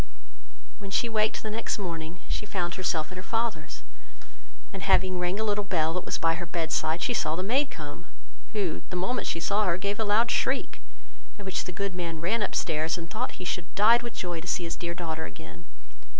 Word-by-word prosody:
When 200 -2 -7
she 215 +5 +2
waked 215 -1 +1
the 215 - -3
next 225 +2 -1
morning, 170 -3 -4
she 210 - -2
found 175 -3 -1
herself 165 -4 0
at 185 - -7
her - - -4
father's, 220 -9 -2 0.9
and 195 - -5
having 185 -1 +4
rang 180 +3 0
a - - +1
little 205 -1 +1
bell, 165 -5 +1
that 180 - -2
was - - 0
by 165 0 +3
her 175 +1 -4
bed 165 -1 -1
side, 160 +2 +1
she 245 - +2
saw 155 -8 +1
the 185 - -1
maid 265 +8 +3
come; 155 +2 -8 0.5
who, 195 -7 0
the - - -4
moment 190 +8 0
she 165 - 0
saw 205 +5 +2
her, 175 -2 +2
gave 200 +3 -1
a - - +3
loud 220 +3 +4
shriek; - - +1 0.6
at 200 - -9
which 190 - -1
the - - -4
good 200 +2 -2
man 170 -3 -3
ran 200 +8 +1
up - - 0
stairs, 160 +1 +1
and 165 -1 -7
thought 240 +4 -2
he 185 - -7
should 175 -1 -1
have - - -28
died 225 +4 +7
with 240 -1 -6
joy 175 -2 -2
to 175 - -10
see 180 - +1
his 165 - -2
dear 170 0 -3
daughter 160 -2 -3
again. 85 - -10
180 Hz, 225 wpm, -29 LUFS, 165-205 Hz, 0.9 s, died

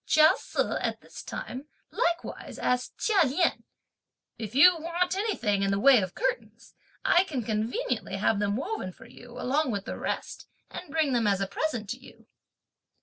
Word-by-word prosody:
Chia 310 0 +7
Se, - - -2
at - - -2
this - - -11
time, 260 +4 -7 0.2
likewise, 340 0 -2
asked 250 0 -1
Chia 415 -5 +3
Lien: 310 +5 +1 0.8
"If 220 0 -6
you 355 +6 +8
want 345 +3 -1
anything 250 - 0
(in 195 - +1
the 195 0 +1
way 260 0 +7
of 185 -1 -5
curtains), - - -3 0.3
I 360 -7 +5
can 275 -9 -3
conveniently 220 0 -2
have 200 +1 +1
them 205 0 0
woven 275 - -4
for - - -15
you, 245 0 -12
along 285 +3 +1
with 200 -4 -3
the - - -5
rest, - - -4 0.2
and 360 - -8
bring 305 -2 +1
them 235 -3 +2
as 200 -1 +2
a 195 - 0
present 230 +1 -3
to 245 - -5
you." - - -16
255 Hz, 175 wpm, -28 LUFS, 210-335 Hz, 0.8 s, you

